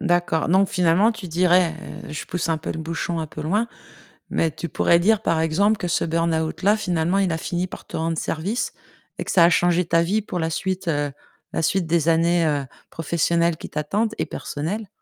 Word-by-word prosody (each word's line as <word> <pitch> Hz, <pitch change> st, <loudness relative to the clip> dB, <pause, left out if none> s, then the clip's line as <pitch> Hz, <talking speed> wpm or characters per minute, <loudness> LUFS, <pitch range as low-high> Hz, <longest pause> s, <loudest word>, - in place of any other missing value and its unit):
d'accord. 175 Hz, -4 st, +1 dB
Donc 190 Hz, +3 st, +4 dB
finalement 180 Hz, +5 st, +3 dB
tu 220 Hz, -4 st, -8 dB
dirais, 175 Hz, 0 st, +3 dB, 0.3 s
heu, -, -, -7 dB
je 150 Hz, -, -5 dB
pousse 175 Hz, -1 st, -2 dB
un 160 Hz, -, +1 dB
peu 155 Hz, -, -5 dB
le -, -, -6 dB
bouchon 165 Hz, +1 st, -3 dB
un 160 Hz, -, -3 dB
peu 155 Hz, -, -9 dB
loin, 205 Hz, +10 st, 0 dB, 0.6 s
mais 165 Hz, -, +1 dB
tu 170 Hz, +3 st, -6 dB
pourrais 170 Hz, +3 st, +3 dB
dire, 215 Hz, +4 st, +3 dB
par 165 Hz, -5 st, +1 dB
exemple, 200 Hz, +7 st, +2 dB
que 180 Hz, -, -3 dB
ce 175 Hz, -, +1 dB
burn-out 165 Hz, -1 st, -1 dB
là, 205 Hz, +3 st, +4 dB
finalement, 180 Hz, -3 st, 0 dB
il 195 Hz, -3 st, +2 dB
a 160 Hz, -, -1 dB
fini 175 Hz, +2 st, -2 dB
par -, -, -10 dB
te -, -, -6 dB
rendre 165 Hz, 0 st, -1 dB
service 190 Hz, +12 st, -2 dB, 0.4 s
et -, -, -3 dB
que -, -, -3 dB
ça 175 Hz, -, +6 dB
a 170 Hz, -, +7 dB
changé 175 Hz, 0 st, +2 dB
ta 165 Hz, 0 st, +3 dB
vie 195 Hz, +6 st, +1 dB
pour 185 Hz, -3 st, -5 dB
la 160 Hz, -1 st, 0 dB
suite, 185 Hz, +2 st, -3 dB
heu, 145 Hz, -3 st, 0 dB, 0.4 s
la -, -, -1 dB
suite 175 Hz, +2 st, +1 dB
des 165 Hz, -1 st, +1 dB
années, 170 Hz, +1 st, +3 dB
heu, 145 Hz, -3 st, 0 dB, 0.2 s
professionnelles 170 Hz, +1 st, 0 dB
qui -, -, -8 dB
t'attendent 200 Hz, +9 st, -1 dB
et -, -, -1 dB
personnelles? 190 Hz, +9 st, -4 dB
170 Hz, 215 wpm, -23 LUFS, 160-185 Hz, 0.6 s, a